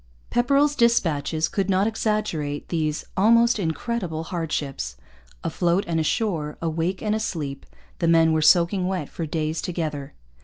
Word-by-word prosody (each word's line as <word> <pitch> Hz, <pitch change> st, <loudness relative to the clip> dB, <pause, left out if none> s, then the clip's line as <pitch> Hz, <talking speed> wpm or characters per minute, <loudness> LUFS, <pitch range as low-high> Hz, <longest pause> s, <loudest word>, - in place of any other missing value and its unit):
Pepperrell's 280 Hz, +4 st, +3 dB
dispatches 165 Hz, -, +2 dB
could 195 Hz, -1 st, -2 dB
not 190 Hz, +1 st, +3 dB
exaggerate 210 Hz, -10 st, -2 dB
these 155 Hz, -3 st, -1 dB
'almost 230 Hz, +3 st, +4 dB
incredible 175 Hz, -1 st, -2 dB
hardships.' 145 Hz, -, -3 dB, 0.5 s
Afloat 175 Hz, +3 st, +1 dB
and 165 Hz, -1 st, -1 dB
ashore, 160 Hz, -2 st, -1 dB
awake 165 Hz, +3 st, -2 dB
and 210 Hz, -1 st, +1 dB
asleep, 160 Hz, -10 st, -3 dB, 0.3 s
the 170 Hz, -, +1 dB
men 165 Hz, -1 st, +5 dB
were 160 Hz, -, +2 dB
soaking 180 Hz, +3 st, +4 dB
wet 185 Hz, -6 st, -2 dB
for 165 Hz, -, -5 dB
days 155 Hz, +1 st, -2 dB
together. 155 Hz, -5 st, -4 dB
170 Hz, 130 wpm, -24 LUFS, 155-210 Hz, 0.5 s, men